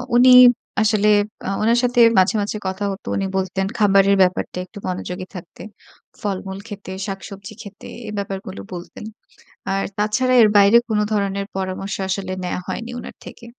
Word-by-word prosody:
উনি 250 +1 +7 0.5
আসলে 210 -1 +2 0.4
আ - - -1
উনার 230 +2 +3
সাথে 245 0 +1 0.2
মাঝে, 190 +4 +4
মাঝে 205 +1 -3
কথা 190 +2 -4
হতো। 195 - -9
উনি 195 - -1
বলতেন 190 0 -1
খাবারের 200 -1 +4
ব্যাপারটা 180 0 0
একটু 205 - -15
মনোযোগী 185 0 -5
থাকতে। 175 -1 -10 0.6
ফলমূল 195 -1 -4
খেতে, 205 -3 -9 0.2
শাকসবজি 195 +1 -8
খেতে। 205 -3 -12 0.2
এ - - -5
ব্যাপারগুলো 195 -1 -5
বলতেন। 175 +4 -9 0.7
আর 195 - -1
তাছাড়া 255 +5 +1
এর 215 - +6
বাইরে 200 +2 +6
কোনো 210 -2 +1
ধরনের 200 -1 -1
পরামর্শ 190 +1 -4
আসলে 190 -1 -3
নেয়া 180 - -3
হয়নি 230 +1 -5
উনার - - -9
থেকে। - - -11
200 Hz, 155 wpm, -20 LUFS, 190-210 Hz, 0.7 s, উনি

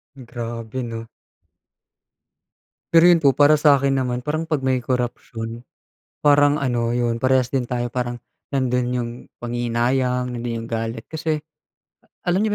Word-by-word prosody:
Grabe 120 -1 -6
'no? 115 -1 -6 1.9
Pero 165 0 +7
yun 170 - +5
po 140 -4 +4
para 145 +1 +5
sa 150 -2 +6
akin 135 0 +1
naman, 125 -1 -2
parang 155 +2 -2
'pag 150 -4 -1
may 130 -1 +2
korapsiyon, 120 -2 -3 0.6
parang 145 0 +4
ano, 120 -3 0
yun, 120 0 -1
parehas 130 -1 +3
din 130 -1 -1
tayo 120 0 -2
parang 120 0 -3 0.3
nandun 125 -2 +1
yung 120 -2 -1 0.3
panghihinayang, 120 +1 0
nandun 115 -1 -3
yung - - -8
galit. 115 0 -3
Kasi 160 -1 -2 0.8
alam 180 +2 +1
niyo 205 - 0
125 Hz, 140 wpm, -22 LUFS, 120-140 Hz, 1.9 s, Pero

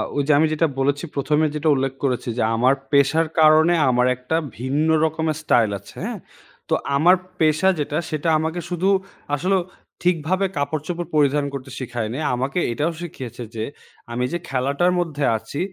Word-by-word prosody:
ওই 145 - +2
যে 155 - +4
আমি 160 - +4
যেটা 160 +1 +2
বলেছি 140 +2 +1
১ম 150 +2 +1
এ - - +3
যেটা 155 +1 +1
উল্লেখ 135 0 -1
করেছি 125 -2 -1
যে - - +1
আমার 125 +4 +4 0.2
পেশার 145 +3 +3
কারণে 155 +2 +6 0.2
আমার 125 0 +3
একটা 125 +6 -3 0.2
ভিন্ন 140 +6 0 0.2
রকমের 160 -1 -1
স্টাইল 115 -7 +3
আছে 100 - -16
হ্যাঁ? - - -4 0.5
তো - - +1 0.2
আমার 175 +6 +6 0.2
পেশা 155 +3 +3
যেটা 145 +1 -2
সেটা 155 +1 -1
আমাকে 160 +2 -2
শুধু 180 +2 0 0.5
আসলেও 185 +5 +1 0.4
ঠিকভাবে 180 +2 +1
কাপড়চোপড় 155 +4 -2
পরিধান 145 -1 +3
করতে 135 -1 -6
শেখায়নি, 120 0 -4 0.2
আমাকে 135 +7 -1
এটাও 150 +8 0
শিখিয়েছে 125 -8 -7
যে 110 - -2 0.5
আমি 125 +1 -1
যে 175 - +1
খেলাটার 140 +7 +1
মধ্যে 150 -4 -2
আছি 115 +6 -7
145 Hz, 165 wpm, -22 LUFS, 130-160 Hz, 0.5 s, কারণে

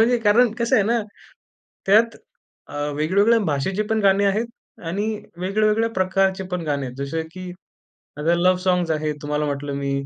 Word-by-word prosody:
म्हणजे 240 +2 +4
कारण 225 +2 +4
कसं 235 0 +2
आहे 205 - +4
ना, 235 +3 +1 0.9
त्यात 225 +4 +4 0.5
अ, - - -11 0.2
वेगवेगळ्या 200 +9 +3
भाषेची 185 +9 -1
पण 220 - +2
गाणे 195 0 +4
आहेत 210 +4 +1 0.4
आणि 200 +5 -2 0.3
वेगवेगळ्या 215 +4 +1
प्रकारचे 190 0 +1
पण 180 - -1
गाणे 140 -3 -1
आहेत. 125 - -8
जसं 140 +4 -3
की 185 0 -8 0.7
आता 165 +3 +2
लव्ह 180 +1 +3
सॉन्ग्स 180 -2 +1
आहेत 155 -1 -1
तुम्हाला 150 0 -1
म्हटलं 140 0 -3
मी. 140 0 -2
185 Hz, 160 wpm, -22 LUFS, 150-215 Hz, 0.9 s, म्हणजे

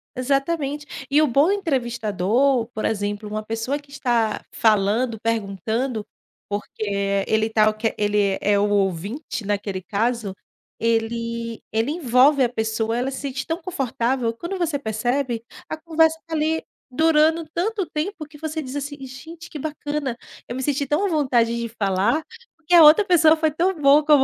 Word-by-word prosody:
exatamente, 275 +1 -2
e 290 +2 +4
o 310 - +4
bom 280 +8 +3
entrevistador, 245 - +1
por 215 - -3
exemplo, 205 0 -2
uma 215 0 -3
pessoa 225 +5 -2
que 285 -1 -20
está 235 -6 0
falando, 220 +2 +2
perguntando, 220 +2 -2 0.4
porque 200 -1 -2
ele 220 0 +2
está 215 -1 +3
o 215 - -2
que 220 +1 -1
ele 205 -2 +1
é 205 0 +3
o 205 - +2
ouvinte 200 - -2
naquele 200 -2 -2
caso, 220 0 -1 0.5
ele 230 0 -1
ele 225 +6 0
envolve 275 -2 +4
a 240 - +2
pessoa, 220 0 -1
ela 260 +2 -1
se 265 - -5
sente 265 -2 -4
tão 330 +2 -3
confortável, 255 -7 -1
quando 345 +9 -5
você 330 -5 -1
percebe, 240 +1 -1 0.3
a 315 - -3
conversa 320 0 +2
está 330 0 -10
ali 315 +1 0 0.3
durando 320 +3 +3
tanto 395 +2 -1
tempo 315 +2 -3
que 295 0 -15
você 315 +1 -4
diz 260 -1 -7
assim: 285 0 -4
"Gente 325 +6 -10
que 300 - -7
bacana, 290 -3 -3 0.3
eu 240 - -5
me 260 - -3
senti 285 +1 0
tão 325 +8 +1
vontade 250 -7 +2
de 235 - -2
falar, 205 +7 0 0.3
porque 330 +1 -4
a 335 - +9
outra 310 +7 +8
pessoa 330 -4 +5
foi 315 -1 +1
tão 355 +5 +1
boa 285 +1 +6
como 295 -3 +6
255 Hz, 165 wpm, -22 LUFS, 220-305 Hz, 0.5 s, a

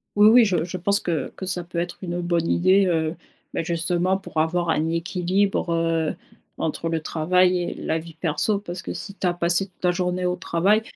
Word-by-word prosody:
Oui, 210 +1 +7
oui, 235 +1 +7
je 180 -6 +1
je 180 +2 -5
pense 200 +3 +1
que 165 -4 -2
que 190 - -6
ça 180 -1 -2
peut 170 0 -8
être 175 +1 -2
une, 175 -2 -4
heu, 175 - -2
bonne 170 -1 0
idée, 185 +2 +4
heu, 160 -1 0 0.4
beh, - - -1
justement 175 +3 0
pour 195 -4 -10
avoir 170 +2 +1
un 160 0 +1
équilibre, 180 +2 0
heu, 165 -1 0 0.4
entre 165 +1 -2
le 165 -1 0
travail 180 +4 +2
et - - -3
la 160 - -2
vie 165 0 -11
perso. 165 +6 0
Parce 180 -2 -7
que - - -5
si 200 - -7
tu 185 - -1
as 175 - +2
passé 175 +2 +1
toute 185 -1 -32
la 180 - +4
journée 180 0 -1
au 180 0 +1
travail 190 +4 +2
175 Hz, 220 wpm, -23 LUFS, 165-185 Hz, 0.4 s, Oui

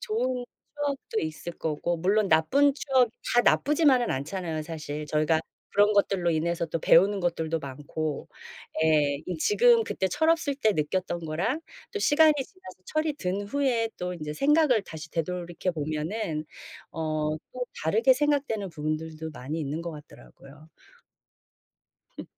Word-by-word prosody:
좋은 260 - -1 0.3
추억도 280 -6 -2
있을 160 +2 -5
거고 160 +2 -1
물론 200 +3 +2
나쁜 270 - +4
추억 260 -5 +2 0.2
다 240 - +7
나쁘지만은 285 -4 +3
않잖아요 155 +3 -3
사실. 150 -2 -6
저희가 155 +1 +2 0.3
그런 205 +1 +4
것들로 195 -3 +2
인해서 170 +1 0
또 165 +1 -2
배우는 195 +5 +5
것들도 165 -2 -1
많고. 145 +2 -5 0.6
예. 150 -3 +3
이 180 - -3
지금 465 - +4
그때 190 - -1
철없을 320 - +2
때 220 -6 +2
느꼈던 175 +2 -1
거랑 195 - -1 0.3
또 420 - -2
시간이 310 -3 +5
지나서 280 - -8
철이 310 0 0
든 195 -6 -2
후에 235 0 0
또 180 0 -3
인제 150 -3 -5
생각을 280 - +3
다시 160 -2 -9
되돌이켜 175 +2 -2
보면은 155 +2 -3 0.5
어 155 -1 -1 0.2
또 250 0 -3 0.2
다르게 220 +11 +4
생각 290 +1 +1
되는 205 -3 -3
부분들도 155 0 -4
많이 150 +2 -5
있는 150 +3 -3
것 170 - -4
같더라고요. 150 0 -14 1.5
흠. - - -5
180 Hz, 305 characters per minute, -27 LUFS, 155-255 Hz, 1.5 s, 다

